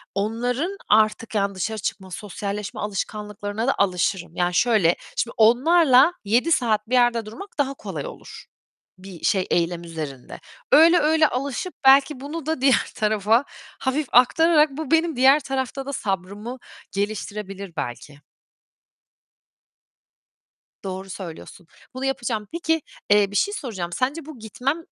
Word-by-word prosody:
onların 245 - -2
artık, 220 +1 +2
yani 200 -1 0
dışarı 220 +4 -3
çıkma, 190 -1 -5
sosyalleşme 205 +1 -5
alışkanlıklarına 210 +1 -4
da 270 - +2
alışırım. 180 -2 0
Yani, 175 0 0
şöyle, 205 -5 +3 0.2
şimdi 235 - -1
onlarla 265 +6 +5
7 240 +11 +2
saat 220 -6 +1
bir - - -4
yerde 240 -2 +3
durmak 230 - -9
daha 275 -2 0
kolay 275 - -6
olur - - -11 0.5
bir 185 -3 -12
şey, 190 -2 +1
eylem 170 0 0
üzerinde. 155 -6 -7 0.3
Öyle, 330 +4 +7
öyle 310 +1 +4
alışıp 280 +8 -3
belki 270 0 +5
bunu 295 +2 -6
da 315 -4 -2
diğer 270 -1 +3
tarafa 215 +2 +2 0.4
hafif 275 +2 -1
aktararak 305 +5 +5
bu 290 0 -6
benim 325 -1 +2
diğer 265 +4 +6
tarafta 270 0 -3
da 280 - -5
sabrımı 200 +4 -4 0.3
geliştirebilir 200 -2 -4
belki. 140 +4 -6 2.6
Doğru 190 0 -6
söylüyorsun. 175 -2 -9 0.3
Bunu 260 +1 -4
yapacağım. 240 -5 -2
Peki, 325 -1 0 0.3
eee, 205 -1 +4
bir - - -8
şey 405 - +1
soracağım, 195 - -5
sence 275 +5 -2
bu 305 -5 -11
gitmem, 245 +7 -2
225 Hz, 130 wpm, -23 LUFS, 200-275 Hz, 2.6 s, Öyle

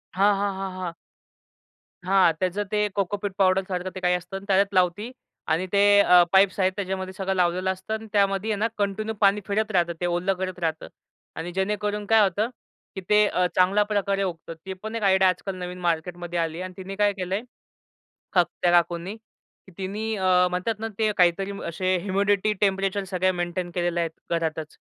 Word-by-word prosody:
हां, 200 +2 +4
हां, 200 0 -1
हां, 190 0 -4
हां. 175 -2 -4 1.1
हां, 190 -2 +5
त्याचं 185 +2 -1
ते 210 0 +2
कोकोपीट 200 +1 -2
पावडरसारखं 185 -1 +1
ते - - -4
काही 180 -1 +2
असतं 180 +2 -6
आणि 195 - -10
त्याच्यात 200 0 +2
लावती 185 +5 +1 0.4
आणि 165 +4 +1
ते 205 0 +6
अ, 180 -3 +7
पाईप्स 195 0 +4
आहेत 185 0 +3
त्याच्यामध्ये 190 -1 -4
सगळं 195 0 -2
लावलेलं 180 +1 +1
असतं 190 +3 -6
अन् 220 0 -5
त्यामध्ये 200 +1 +1
आहे 210 - -1
ना, 225 - +2
कंटिन्यू 210 +2 -1
पाणी 200 +1 +4
फिरत 215 +2 0
राहतं, 175 -3 +1
ते - - 0
ओलं 175 +2 0
करत 185 -1 -5
राहतं 160 -2 -2 0.5
आणि 170 +2 -5
जेणेकरून 210 +1 -1
काय 225 +1 +5
होतं, 205 +4 0 0.5
की 190 - -5
ते 210 0 +5
अ, 180 -2 +1
चांगल्या 190 +3 +4
प्रकारे 200 -1 0
उगतं. 165 -2 -5
ती 190 - -4
पण 220 +1 -5
एक 225 - -3
आयडिया 190 -1 +5
आजकाल 185 +2 -3
नवीन 180 0 -6
मार्केटमध्ये 175 +1 -2
आली 165 -1 -2
आहे - - -4
अन् 185 - -8
तिने 195 +1 -7
काय 205 0 +2
केलंय, 190 +1 -3 1.0
थ - - +5
त्या 175 +1 -1
काकूंनी. 175 +3 +1 0.6
तिनी 210 +4 -3
अ, 185 -2 +3
म्हणतात 185 +5 -2
ना, 225 - -2
ते 215 -1 +2
काहीतरी 180 +3 +3 0.2
असे 185 +3 0
ह्युमिडिटी, 200 +2 +1
टेम्परेचर 195 0 +1
सगळ्या 185 0 0
मेंटेन 175 0 -3
केलेले 175 -1 0
आहेत 165 -1 -4
घरातच. 160 -2 -2
190 Hz, 185 wpm, -25 LUFS, 180-200 Hz, 1.1 s, अ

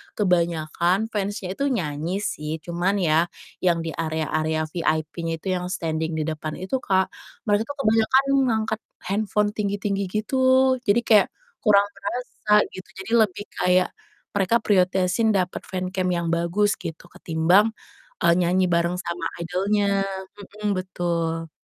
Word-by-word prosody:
kebanyakan 175 +2 +1
fans-nya 200 -2 -3
itu 280 +8 -1
nyanyi 175 - -2
sih, 150 -3 -3
cuman 175 +3 0
ya, 165 +2 +3 0.3
yang 170 -2 +1
di 165 - -3
area-area 155 0 -1
VIP-nya 165 0 -1
itu 190 - -1
yang 180 -1 -1
standing 160 -3 -2
di 155 - -1
depan 155 0 -4
itu, 190 +8 -2
Kak, 190 -5 +1 0.3
mereka 210 +1 +1
tuh 285 - -5
kebanyakan 225 +4 +4 0.2
ngangkat 220 -1 0 0.2
handphone 205 +1 0
tinggi-tinggi 200 -1 -2
gitu, 215 +7 -2 0.5
jadi 200 +4 +5
kayak 215 -3 +5 0.3
kurang 200 -3 +5
terasa 210 +2 -5 0.2
gitu 185 - -10 0.2
jadi 225 - -8 0.2
lebih 205 +3 -9
kayak, 180 0 +3 0.4
mereka 200 +2 +2
prioritasin 190 +2 +2
dapet 185 -1 -1
fancam 185 0 -2
yang 170 -1 -1
bagus 170 +5 +1
gitu 165 +2 -8
ketimbang, 180 +7 +2 0.5
eee, 170 - +6
nyanyi 180 +1 +2
bareng 170 +1 +2
sama 170 -1 -4 0.2
idol-nya, 195 +2 +1 0.6
mhm, 205 - +2
betul. 170 -3 -2
185 Hz, 135 wpm, -24 LUFS, 170-205 Hz, 0.6 s, eee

